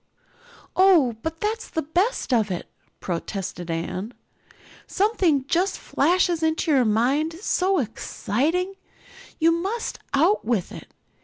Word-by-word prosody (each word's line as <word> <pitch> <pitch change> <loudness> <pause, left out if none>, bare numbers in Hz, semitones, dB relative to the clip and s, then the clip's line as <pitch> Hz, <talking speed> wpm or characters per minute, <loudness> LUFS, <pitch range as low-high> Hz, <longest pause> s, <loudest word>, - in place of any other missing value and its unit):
"Oh, 350 - +5
but 320 +3 -4
that's 440 +2 -2
the 320 - -2
best 350 - 0
of 220 -4 +2
it," 180 -2 -4 0.3
protested 175 0 -4
Anne. 185 +7 -4 0.7
"Something 370 - +1
just 360 +7 +1
flashes 345 +2 +1
into 320 +1 +1
your 265 -4 +4
mind, 265 +9 +1
so 380 -1 +1
exciting, 290 - -1
and 390 - -14 0.6
you 330 0 +4
must 390 +8 -2 0.2
out 345 +10 +3
with 220 -6 -1
it. - - -11
320 Hz, 125 wpm, -24 LUFS, 235-370 Hz, 0.7 s, Oh